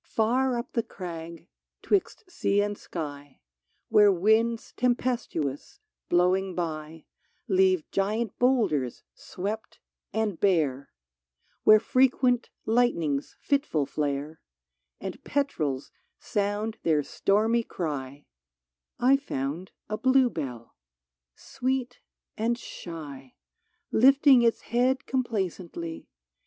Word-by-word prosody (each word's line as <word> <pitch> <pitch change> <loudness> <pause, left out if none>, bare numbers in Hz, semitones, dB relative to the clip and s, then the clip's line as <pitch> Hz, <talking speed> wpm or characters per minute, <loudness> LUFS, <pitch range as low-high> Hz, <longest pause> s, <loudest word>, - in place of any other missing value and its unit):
AR 245 +3 +2
up 235 - -6
the 230 - +2
crag, 170 -5 -8 0.4
'twixt 400 +1 0
sea 350 - 0
and 205 0 0
sky, 145 -7 -7 0.5
Where 210 -1 +6
winds 220 +5 +2
tempestuous, 240 - -1 0.3
blowing 185 +1 +2
by, 160 -2 -4 0.4
Leave 185 -4 +3
giant 210 +3 -1
boulders 205 - +1
swept 210 +4 -6 0.3
and 215 -5 -1
bare: 155 -9 +1 0.8
Where 215 0 +8
frequent 250 +1 +2 0.2
lightnings 170 - +1
fitful 275 - +1
flare, 145 +2 -3 0.6
And - - -7
petrels 155 - -1 0.3
sound 210 +2 -2
their 155 -3 +2
stormy 220 +9 +1
cry, 145 - -5 0.4
— 60 0 -57
I 275 - +7
found 165 - -4 0.2
a 215 - -3
bluebell, 165 - +1 0.6
sweet 255 -1 -3 0.4
and 235 +2 0
shy, 145 - -9 0.6
Lifting 270 +1 +6
its 230 -1 +2
head 250 +3 +1
complacently. 185 -9 -3
200 Hz, 95 wpm, -27 LUFS, 155-240 Hz, 0.8 s, Where